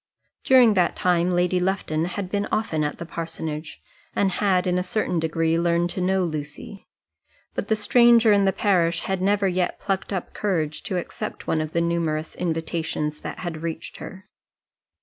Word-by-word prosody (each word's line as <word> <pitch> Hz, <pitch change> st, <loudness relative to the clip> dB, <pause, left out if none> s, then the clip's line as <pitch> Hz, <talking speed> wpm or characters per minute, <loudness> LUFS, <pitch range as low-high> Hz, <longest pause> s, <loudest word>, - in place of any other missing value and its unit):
During 250 Hz, -4 st, +6 dB
that 180 Hz, -3 st, +2 dB
time 175 Hz, -1 st, +2 dB
Lady 180 Hz, 0 st, +2 dB
Lufton 180 Hz, -4 st, 0 dB
had 180 Hz, +1 st, -4 dB
been 205 Hz, 0 st, -1 dB
often 215 Hz, -8 st, 0 dB
at 150 Hz, -, -2 dB
the 170 Hz, -, -6 dB
parsonage, 160 Hz, -2 st, -6 dB, 0.3 s
and 195 Hz, -1 st, +2 dB
had 185 Hz, -2 st, +1 dB
in 180 Hz, 0 st, +1 dB
a -, -, 0 dB
certain 180 Hz, -2 st, -1 dB
degree 165 Hz, 0 st, +1 dB
learned 170 Hz, 0 st, +1 dB
to 185 Hz, -, -3 dB
know 190 Hz, +1 st, +2 dB
Lucy; 155 Hz, +4 st, -6 dB, 0.7 s
but -, -, -3 dB
the 220 Hz, -, +2 dB
stranger 230 Hz, +1 st, +5 dB
in 200 Hz, -1 st, +4 dB
the 195 Hz, -, +4 dB
parish 175 Hz, -5 st, +1 dB
had 190 Hz, -1 st, -2 dB
never 200 Hz, +1 st, +2 dB
yet 180 Hz, -1 st, -1 dB
plucked 195 Hz, -1 st, -2 dB
up 190 Hz, -3 st, -4 dB
courage 160 Hz, -7 st, -1 dB
to 185 Hz, -, -2 dB
accept 175 Hz, -, -5 dB
one 160 Hz, -, 0 dB
of 155 Hz, 0 st, -5 dB
the 170 Hz, -, +2 dB
numerous 165 Hz, -2 st, -1 dB
invitations 160 Hz, -2 st, -2 dB
that -, -, -6 dB
had 170 Hz, -3 st, -5 dB
reached 165 Hz, -1 st, -5 dB
her. 190 Hz, +2 st, -10 dB
180 Hz, 175 wpm, -24 LUFS, 165-195 Hz, 0.7 s, During